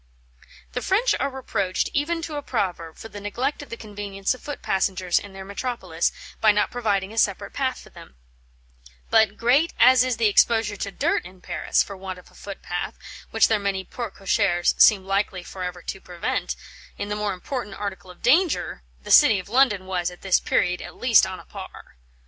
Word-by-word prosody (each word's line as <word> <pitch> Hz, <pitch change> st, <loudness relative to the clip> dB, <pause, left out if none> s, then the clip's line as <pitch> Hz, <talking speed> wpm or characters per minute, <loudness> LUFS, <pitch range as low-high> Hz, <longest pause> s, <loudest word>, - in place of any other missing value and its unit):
"The 250 Hz, -, -2 dB
French 430 Hz, -, +2 dB
are 275 Hz, -, 0 dB
reproached, 200 Hz, -8 st, -2 dB
even 330 Hz, +4 st, 0 dB
to 315 Hz, -2 st, -5 dB
a 290 Hz, -, -2 dB
proverb, 180 Hz, -, -3 dB
for -, -, -9 dB
the 205 Hz, -2 st, -9 dB
neglect 245 Hz, +9 st, -2 dB
of 290 Hz, -, -11 dB
the 230 Hz, -, -6 dB
convenience 205 Hz, -2 st, -3 dB
of 255 Hz, -, -12 dB
foot 290 Hz, -, -7 dB
passengers 185 Hz, -2 st, +1 dB
in 200 Hz, -1 st, -11 dB
their 190 Hz, 0 st, -8 dB
metropolis, 200 Hz, -5 st, -2 dB, 0.3 s
by 215 Hz, -, +7 dB
not 210 Hz, 0 st, +1 dB
providing 210 Hz, -4 st, -1 dB
a 225 Hz, -, 0 dB
separate 200 Hz, -3 st, 0 dB
path 260 Hz, -2 st, -1 dB
for -, -, -16 dB
them; 65 Hz, -, -14 dB, 1.0 s
but, 220 Hz, -2 st, +4 dB
great 270 Hz, +8 st, +3 dB
as 255 Hz, 0 st, +7 dB
is 255 Hz, -3 st, -1 dB
the 230 Hz, -, +1 dB
exposure 215 Hz, 0 st, +3 dB
to 200 Hz, -, -4 dB
dirt -, -, 0 dB
in 185 Hz, +1 st, -13 dB
Paris, -, -, 0 dB
for 200 Hz, -, -8 dB
want 190 Hz, -1 st, -7 dB
of 180 Hz, -, -16 dB
a -, -, -24 dB
footpath, 175 Hz, -3 st, -6 dB, 0.3 s
which 225 Hz, -2 st, +4 dB
their 220 Hz, -2 st, +2 dB
many 200 Hz, -1 st, -1 dB
porte 235 Hz, +3 st, -6 dB
cochères 175 Hz, -2 st, +2 dB
seem 195 Hz, -3 st, +7 dB
likely 195 Hz, -2 st, -1 dB
for 185 Hz, -, -9 dB
ever 180 Hz, -1 st, -5 dB
to 190 Hz, -, -6 dB
prevent, 175 Hz, -1 st, -3 dB, 0.4 s
in 205 Hz, -, -4 dB
the 210 Hz, -, -1 dB
more 210 Hz, -1 st, -1 dB
important 205 Hz, +2 st, -5 dB
article 195 Hz, -2 st, -6 dB
of 180 Hz, -, -14 dB
danger, 315 Hz, -, +2 dB, 0.2 s
the -, -, -5 dB
City 210 Hz, -, +8 dB
of 185 Hz, +1 st, -7 dB
London 230 Hz, -6 st, +3 dB
was, 180 Hz, -2 st, -1 dB
at 180 Hz, -, -13 dB
this 190 Hz, -2 st, +4 dB
period, 180 Hz, 0 st, +1 dB
at -, -, -9 dB
least 240 Hz, -6 st, +5 dB
on 185 Hz, -1 st, -6 dB
a -, -, -14 dB
par. -, -, -11 dB
205 Hz, 200 wpm, -24 LUFS, 190-245 Hz, 1.0 s, City